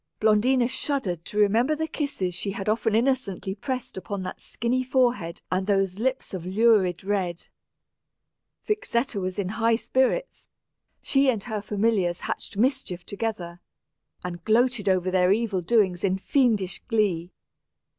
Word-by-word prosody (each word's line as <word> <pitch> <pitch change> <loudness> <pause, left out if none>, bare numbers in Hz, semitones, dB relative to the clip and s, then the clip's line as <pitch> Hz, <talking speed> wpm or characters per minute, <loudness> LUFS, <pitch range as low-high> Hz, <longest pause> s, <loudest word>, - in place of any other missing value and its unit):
Blondina 235 +4 +3
shuddered 245 - -2
to 210 - -7
remember 225 +8 +3
the 320 +1 -2
kisses 280 - -2
she 200 - -3
had 195 0 -5
often 220 0 +1
innocently 225 -6 0
pressed 255 +3 -5
upon 195 0 -4
that 185 - -6
skinny 245 +3 -1
forehead 245 -10 0
and 185 +1 0
those 195 -1 +1
lips 260 0 -1
of 185 -3 -4
lurid 190 -2 +3
red. 190 -4 -2 1.2
Vixetta 260 - -1
was 185 +1 -3
in 195 -3 -1
high 225 +2 +2
spirits; 260 - -1 0.5
she 270 -1 +3
and 220 -6 0
her 215 -3 -4
familiars 200 -4 0
hatched - - -5
mischief 235 -7 0
together, 195 -5 -4 0.6
and 175 -1 -6
gloated 230 -2 +2
over 185 -1 +1
their 180 0 +3
evil 205 -3 +1
doings 185 -2 +2
in 190 -1 +2
fiendish 210 -5 +1
glee. 190 -7 0
210 Hz, 140 wpm, -25 LUFS, 185-245 Hz, 1.2 s, Blondina